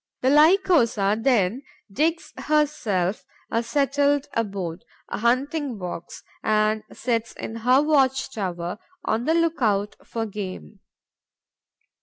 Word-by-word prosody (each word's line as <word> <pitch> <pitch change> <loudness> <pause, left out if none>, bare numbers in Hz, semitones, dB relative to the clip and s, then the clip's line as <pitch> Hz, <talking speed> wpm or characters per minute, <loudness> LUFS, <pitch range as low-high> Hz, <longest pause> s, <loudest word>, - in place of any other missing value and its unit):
The 260 - +3
Lycosa 295 - +4
then 230 -2 +2 0.3
digs 320 +9 -1
herself 225 -12 0 0.3
a 230 - +1
settled 285 +2 +1
abode, 195 -6 -3 0.3
a - - -4
hunting 260 +3 0
box, 175 -2 -7 0.2
and 215 0 +2
sits 230 -2 -2
in 225 - -6
her 250 +5 +4
watch 270 -4 +2
tower, 180 -2 -4 0.3
on 225 +2 0
the 320 +2 +2
look 335 -3 +1
out 205 -2 +1
for 225 -1 -4
game. 190 - -7
230 Hz, 115 wpm, -24 LUFS, 205-285 Hz, 0.3 s, Lycosa